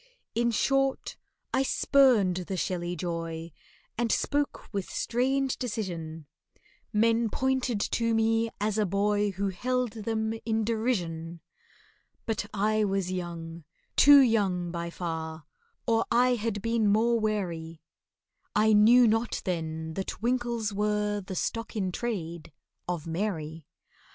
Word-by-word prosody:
In 235 +1 +2
short, 270 +4 +1 0.4
I 265 - +3
spurned 255 -9 +4
the 190 - -3
shelly 175 +1 -2
joy, 165 -1 -4 0.5
And 235 -2 +1
spoke 290 0 -1
with 195 -2 -3
strange 265 +2 0
decision— 170 -10 -4 0.7
Men 230 +1 +2
pointed 260 -2 0
to 230 +1 0
me 225 +1 +2
as 210 +1 0
a 210 - +2
boy 205 +2 +1
Who 195 +2 -1
held 250 +5 -1
them 220 0 -2
in 225 -1 0
derision. 175 -8 -2 0.9
But 215 -2 -2
I 215 +1 +1
was 195 -2 -1
young—too 170 - +3
young, 195 -8 +1
by 170 0 -4
far— 160 -2 -5 0.4
Or 230 -1 +2
I 250 +2 +4
had 220 -3 -2
been 230 -2 +1
more 230 +3 +3
wary, 170 -7 -3 0.7
I 215 0 +4
knew 230 +4 +7
not 225 +2 0
then 160 -3 -3
that 190 +3 -4
winkles 235 -2 -1
are 210 0 0
The 190 0 -7
stock 230 +6 -3
in 190 -4 -1
trade 170 -7 -4 0.4
of 175 -3 -3
MARY. 165 -3 -3
210 Hz, 125 wpm, -28 LUFS, 175-230 Hz, 0.9 s, knew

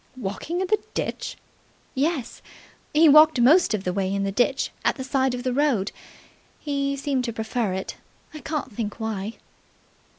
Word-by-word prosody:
"Walking 260 - -3
in - - +1
the 430 +3 +2 0.2
ditch!" - - -3 0.6
"Yes. 280 -2 -1 0.5
He 315 +2 +6
walked 305 -1 +7
most 275 +1 +5
of 195 - -5
the 180 - -1
way 190 0 -1
in 200 0 -1
the 195 - -1
ditch 250 +6 +1
at - - +2
the 260 - -5
side 265 -1 +1
of 245 - -6
the 255 -1 0
road. 260 -8 +1 0.7
He 280 -1 -1
seemed 275 -2 -1
to 235 - -2
prefer 220 -2 -2
it. 190 0 -5 0.4
I 305 - -7
can't 300 -6 -4
think 210 -1 -4
why." 220 -1 -3
255 Hz, 170 wpm, -24 LUFS, 215-290 Hz, 0.7 s, walked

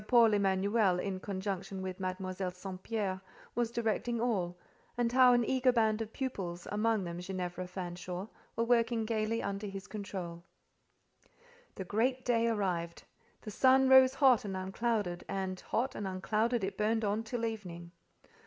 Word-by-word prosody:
Paul 235 -3 +6
Emanuel, 195 -1 +2
in 190 0 -3
conjunction 195 -1 -4
with 185 0 -5
Mademoiselle 185 0 -3
St. 185 +1 -8
Pierre, 195 -4 -2 0.3
was 240 -1 0
directing 235 +1 -1
all, 190 -7 0 0.4
and 240 -1 +1
how 255 0 +7
an 240 -1 +3
eager 260 +1 +3
band 220 -2 +2
of 220 -1 -5
pupils, 190 -11 -4
amongst 210 -1 +1
them 170 0 -5
Ginevra 180 -1 -4
Fanshawe, 180 +1 -5 0.3
were 230 - +1
working 230 -1 +2
gaily 225 0 -1
under 200 +1 -3
his 195 -1 -7
control. 185 -5 -6 1.3
The 190 - -5
great 250 +6 0
day 235 -1 +2
arrived. 180 -6 -1 0.4
The 215 - -6
sun 260 +4 +5
rose 265 0 +7
hot 265 -5 +5
and 195 -2 -4
unclouded, 195 -1 -1
and 190 -1 -3
hot 255 +3 -1
and 205 - -4
unclouded 215 +5 0
it 195 +2 -3
burned 220 +1 +1
on 205 +2 0
till 230 +1 -3
evening. 175 -6 -6
205 Hz, 155 wpm, -32 LUFS, 185-230 Hz, 1.3 s, how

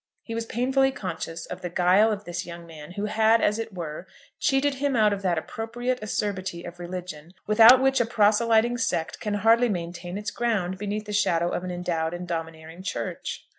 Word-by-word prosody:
He 230 - -7
was 230 0 -3
painfully 265 +3 +2
conscious 170 -7 -5
of 180 +1 -8
the 180 - -4
guile 185 +5 +4
of 210 -1 -3
this 175 0 -4
young 170 0 -9
man, 160 0 -11
who 200 +2 -3
had, 220 +1 +3
as 210 0 +1
it 225 0 -4
were, 170 -1 -6 0.3
cheated 280 0 +2
him 285 -2 +1
out 215 -2 +4
of 200 - -4
that 180 -3 +1
appropriate 240 +8 -3
acerbity 190 -4 -3
of 175 0 -9
religion, 175 -2 -7
without 225 +4 +8
which 270 -1 +3
a - - +2
proselyting 225 +2 +3
sect 165 -7 -1
can 210 -2 -2
hardly 230 +3 +4
maintain 175 -1 -4
its 210 +1 -4
ground 195 -6 -1
beneath 210 +1 -3
the 210 - -6
shadow 175 -4 +2
of 175 - -3
an 185 - -4
endowed 175 -2 -2
and 175 0 -7
domineering 165 0 -6
Church. 190 - -5
200 Hz, 195 wpm, -25 LUFS, 175-225 Hz, 0.3 s, without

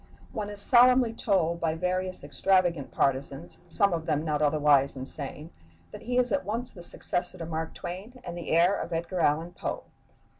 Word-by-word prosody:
One 210 -4 -4
is 205 -1 -5
solemnly 245 +1 +6
told 170 -7 0
by 160 -1 0
various 185 +1 -2
extravagant 170 +1 +1
partisans, 135 0 -1
some 200 +3 +2
of 165 -1 -3
them 155 0 0
not 150 -1 -1
otherwise 145 -2 +3
insane, 140 +4 -6 0.4
that - - -9
he 245 +2 -2
is 250 -1 +2
at 285 - +1
once 230 +4 -3
the 180 - -11
successor 175 +1 -1
to 165 - -6
Mark 160 0 -4
Twain 205 +9 -8
and 175 -1 -6
the 175 - -7
heir 175 +4 +4
of 170 - -5
Edgar 170 +2 -3
Allan 160 +2 +1
Poe. - - -4
170 Hz, 180 wpm, -28 LUFS, 155-200 Hz, 0.4 s, solemnly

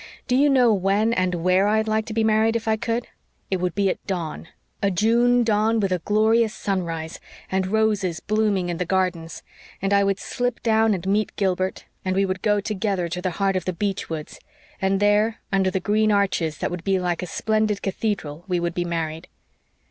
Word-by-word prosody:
Do 250 - +2
you 285 +3 +4
know 250 -4 +5
when 200 +4 +1
and 185 -4 0
where 185 +3 +2
I'd 220 +1 +1
like 220 0 0
to 220 - -5
be 225 - +2
married, 220 +1 +3
if 230 -1 -2
I 220 - +3
could? 235 +1 -2 0.5
It 190 - +2
would 180 -1 -2
be 200 0 +2
at 185 - -2
dawn 165 -4 -4 0.3
a 200 - +2
June 235 +5 +3
dawn, 220 0 +2
with 195 -3 0
a 180 - +1
glorious 220 +4 +2
sunrise, 170 -5 -3 0.3
and 190 0 0
roses 205 -5 +1
blooming 210 -4 0
in 170 - -2
the 180 - -1
gardens; 175 -3 -1 0.4
and 195 +1 0
I 200 0 +4
would 195 -1 +1
slip 245 -1 -3
down 220 -2 +3
and 180 - -6
meet 205 +2 0
Gilbert 190 -1 -1 0.2
and 185 0 -1
we 195 +1 +3
would 185 -1 -3
go 210 -1 +2
together 200 -3 -1
to 180 +2 -4
the 185 - -1
heart 195 -1 +1
of 185 - -2
the 185 - -1
beech 200 +2 -3
woods, 155 -2 -6 0.4
and 190 0 +1
there, 210 +2 +2
under 195 -1 +2
the 190 - -1
green 215 +3 +2
arches 190 -6 +1
that - - -2
would 175 -1 -5
be 195 0 +1
like 175 -2 -1
a 180 - -4
splendid 215 +1 0
cathedral, 190 -6 -3
we 180 -2 0
would 170 0 -2
be 175 - -1
married." 165 -1 -3
195 Hz, 210 wpm, -23 LUFS, 180-220 Hz, 0.5 s, know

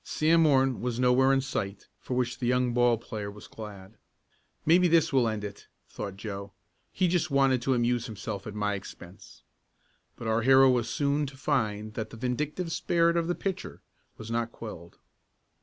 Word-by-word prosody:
Sam 165 +2 +2
Morton 135 -4 +3
was 120 -1 -2
nowhere 130 +1 +4
in 135 0 +3
sight, 105 -7 -4
for 125 - -4
which 125 -1 -1
the 125 - -1
young 125 0 +2
ball 120 -1 +3
player 105 -2 -6
was 105 +1 -11
glad. 105 -1 -10 0.7
"Maybe 175 +3 +5
this 165 -3 +3
will 130 -3 +4
end 110 -2 -3
it," 100 -1 -8 0.2
thought 100 -2 -7
Joe. 100 -1 -6 0.4
"He 185 - +1
just 175 -2 +1
wanted 135 -3 +3
to 130 +1 +1
amuse 120 0 0
himself 105 -2 -6
at 105 - -7
my 105 -1 0
expense." 95 -2 -10 0.7
But 115 - -7
our 110 +1 +2
hero 135 +2 +6
was 120 -2 0
soon 145 +2 0
to 135 0 -11
find 110 -7 -1
that 110 -1 -4
the 115 - -11
vindictive 150 +8 -2
spirit 170 0 +2
of 170 -1 +1
the 175 - 0
pitcher 195 -2 -5 0.3
was 110 +1 -8
not 115 0 -1
quelled. 85 -8 -10
120 Hz, 180 wpm, -28 LUFS, 110-135 Hz, 0.7 s, hero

